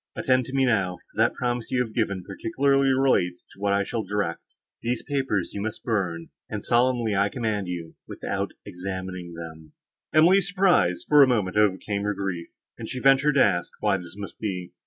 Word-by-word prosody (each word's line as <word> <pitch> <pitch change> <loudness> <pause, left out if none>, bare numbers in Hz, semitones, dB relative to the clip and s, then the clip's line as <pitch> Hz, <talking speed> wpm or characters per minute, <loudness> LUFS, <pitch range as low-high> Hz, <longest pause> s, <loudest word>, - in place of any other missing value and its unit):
Attend 130 -1 +2
to 130 - -6
me 135 -1 +3
now, 100 -7 +1
for - - -29
the - - +5
promise 120 -2 -3
you 130 - 0
have 115 -3 -1
given 100 -5 -1
particularly 135 +8 +1
relates 95 -10 +1
to - - -18
what 100 0 0
I 100 0 +2
shall 110 - -3
direct. 100 -4 -3 0.3
These 120 0 -2
papers 135 - -1
you 100 - -4
must 110 +1 -5
burn—and, 85 -7 -3
solemnly 120 -3 +2
I 100 +1 +2
command 110 -5 -2
you, 85 -2 -5
without - - -4
examining 90 -1 -6
them." 80 -2 -10 0.4
Emily's 180 +5 +5
surprise, 180 - +2
for 150 -1 +7
a 135 - +8
moment, 105 -7 0
overcame 100 0 +1
her 105 0 -1
grief, 95 -4 -4 0.3
and - - -6
she 130 - -4
ventured 135 +2 +4
to 140 - +6
ask, 85 -3 -1
why 105 -2 +2
this 90 -1 -10
must 100 -1 -8
be? 90 -5 -4
105 Hz, 185 wpm, -25 LUFS, 90-130 Hz, 0.4 s, a